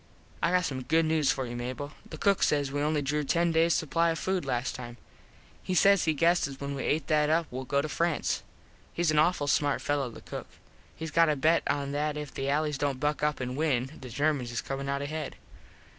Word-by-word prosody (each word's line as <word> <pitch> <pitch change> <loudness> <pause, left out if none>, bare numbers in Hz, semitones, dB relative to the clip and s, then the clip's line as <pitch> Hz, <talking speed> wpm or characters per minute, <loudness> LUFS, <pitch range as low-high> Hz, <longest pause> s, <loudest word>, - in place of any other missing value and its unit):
I 170 - +3
got 180 0 +2
some 130 -4 -3
news 160 -2 +3
for 130 - -2
you, 120 0 -6
Mable. 130 +4 -5 0.2
The 155 - -7
cook 200 +4 +2
says 145 -2 +2
we 145 +1 -1
only 150 0 +1
drew 150 +2 0
ten 170 +4 +2
days 165 +1 +3
supply 165 +2 +1
of 165 - -1
food 185 -1 -1
last 125 -1 -1
time. 120 -1 -8 0.6
He 185 - -2
says 195 +1 +5
he 160 -1 +2
guesses 160 -3 +2
when 140 0 -4
we 135 - -4
et 155 +2 +1
that 150 -2 +2
up 165 +1 +2
well 130 +1 -5
go 140 +2 +1
to - - -2
France. 165 0 0 0.6
Hes 170 -2 +2
an 150 - +3
awful 155 -1 +3
smart 145 0 +2
fello 145 -3 -1
the 115 - -11
cook. - - -7 0.5
Hes 160 -1 -4
got 165 +1 +4
a 150 - +2
bet 160 +4 +3
on 140 -1 -1
that 150 +1 -1
if 150 -1 -6
the 135 +1 -2
allys 150 0 0
dont 140 -3 -1
buck 150 +2 0
up 150 0 0
an 125 0 -3
win 135 -4 0
the 130 - -8
Germans 140 -1 0
is 115 - -2
comin 135 0 -4
out 140 0 -1
ahead. 155 0 -4
150 Hz, 225 wpm, -29 LUFS, 135-160 Hz, 0.6 s, says